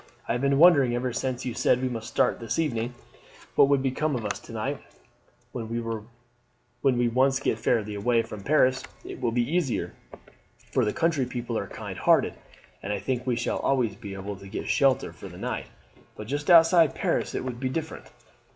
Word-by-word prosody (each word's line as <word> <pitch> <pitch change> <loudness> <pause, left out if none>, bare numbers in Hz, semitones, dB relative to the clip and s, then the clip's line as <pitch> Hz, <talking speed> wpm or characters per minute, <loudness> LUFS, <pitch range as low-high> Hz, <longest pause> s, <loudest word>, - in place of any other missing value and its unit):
"I - - -1
have 120 +1 0
been 140 0 +2
wondering 140 -7 +6
ever 125 0 -2
since 130 0 -3
you 125 - -2
said 125 - +2
we 130 - -1
must 115 -3 -5
start - - +1
this 115 +5 -3
evening, 125 -6 -1 0.6
what - - +6
would 140 -1 +2
become 140 +2 0
of 115 -3 -3
us 105 - -2
to - - -13
night. - - -3 0.7
When 115 -2 -5 1.1
we 125 -3 +2
once 130 +3 +2
get 115 -5 -1
fairly 110 -2 0
away 115 +3 +1
from 105 -2 -8
Paris 130 +1 +3 0.2
it - - -8
will 120 -2 +1
be 120 0 +1
easier, 165 -5 -1 0.8
for - - +2
the 105 - +1
country 155 -4 +1
people 120 -1 -4
are 100 - -2
kind - - -7
hearted, - - +3 0.5
and 100 - -4
I 105 - 0
think 125 +5 -3
we 125 - +2
shall 115 - -1
always 125 -6 +1
be 100 -2 -8
able 100 +1 -6
to 100 - -12
get - - -5
shelter 135 -2 +2
for - - -10
the - - -11
night; - - -4 0.5
but 105 - -8
just 145 - -3
outside 165 -2 +6
Paris - - -1
it - - -2
would 125 -2 -5
be 130 0 -1
different. 160 +4 -5
125 Hz, 195 wpm, -26 LUFS, 115-140 Hz, 1.1 s, wondering